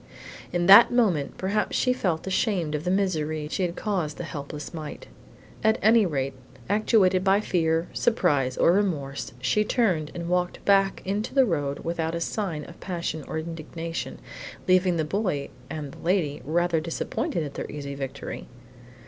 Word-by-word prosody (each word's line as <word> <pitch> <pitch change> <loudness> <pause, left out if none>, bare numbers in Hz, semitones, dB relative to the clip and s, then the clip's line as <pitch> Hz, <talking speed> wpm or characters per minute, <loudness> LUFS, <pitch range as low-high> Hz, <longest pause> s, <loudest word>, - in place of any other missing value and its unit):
In 175 0 0
that 200 +5 +9
moment 200 - +1
perhaps 200 +3 0
she 250 - +2
felt 175 -10 -1
ashamed 190 -4 0
of 150 +2 -3
the - - +1
misery 155 -6 0
she 160 - -3
had 175 -1 -1
caused 180 -9 -2
the - - -4
helpless 150 -1 -7
mite. 155 -2 -7 0.6
At 220 0 +4
any 220 -1 +5
rate, 135 -4 -2 0.3
actuated 200 -3 +3
by 195 +1 +4
fear, 165 -4 +1
surprise, 145 - +1
or - - +5
remorse, 160 -9 -1
she 130 +12 +2
turned 185 -10 +1
and 170 -1 -4
walked 180 0 -1
back 195 -1 +3
into 205 +6 -2
the 270 -1 +6
road 145 - -1
without 165 -1 -1
a - - -2
sign 170 -4 -3
of 170 - -13
passion 170 -4 -4
or - - -4
indignation, 165 +1 -5 0.5
leaving 185 -1 +4
the 160 - 0
boy 180 -5 -1 0.2
and 150 -3 -5
the - - -14
lady 170 -5 0
rather 170 +1 +1
disappointed 165 +1 -2
at 145 -2 -6
their - - -5
easy 140 -1 -6
victory. 135 0 -6
170 Hz, 165 wpm, -26 LUFS, 150-195 Hz, 0.6 s, that